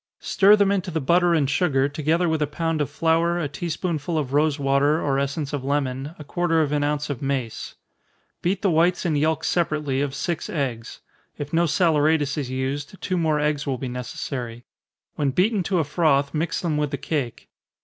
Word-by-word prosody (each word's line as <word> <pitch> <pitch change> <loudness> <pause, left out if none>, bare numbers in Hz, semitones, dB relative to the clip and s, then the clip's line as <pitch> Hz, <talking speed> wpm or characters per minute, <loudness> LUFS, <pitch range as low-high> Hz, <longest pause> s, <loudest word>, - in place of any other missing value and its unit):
Stir 205 +2 +5
them 200 -1 +3
into 190 -2 -1
the 160 -2 -1
butter 170 +4 +3
and 145 -4 +2
sugar, 140 -3 +2
together 155 +4 0
with 160 -1 0
a 150 - +2
pound 165 +1 -1
of 145 - -1
flour, 165 +1 +1
a 165 -4 -1
tea 145 +5 -5
spoonful 165 -1 -2
of 140 -3 -2
rosewater, 145 0 +2
or 135 -3 0
essence 140 +1 -2
of 140 -3 -2
lemon, 140 +1 -2
a 150 - -9
quarter 165 +2 0
of 145 - -2
an 145 -1 +1
ounce 150 0 -1
of 135 - -5
mace. 135 -5 -3 0.7
Beat 190 +3 -1
the 195 - +3
whites 175 +3 +2
and 160 -3 +1
yelks 155 +1 +1
separately 150 -5 0
of 140 -1 -2
six 170 +2 -3
eggs 125 -7 -4 0.4
if 145 +1 -6
no 170 +1 +3
saleratus 155 -3 +2
is 140 -4 -3
used, 135 +7 -3
two 185 - -2
more 160 -3 +1
eggs 150 -1 0
will 135 -2 -1
be 130 - -5
necessary. 125 -1 -5 0.5
When 145 -2 +1
beaten 195 - +2
to 190 +1 0
a 165 - +3
froth, 145 -2 +1
mix 160 +1 -1
them 160 -4 -1
with 150 -1 0
the - - -3
cake. 135 -7 -4
150 Hz, 200 wpm, -23 LUFS, 140-165 Hz, 0.7 s, Stir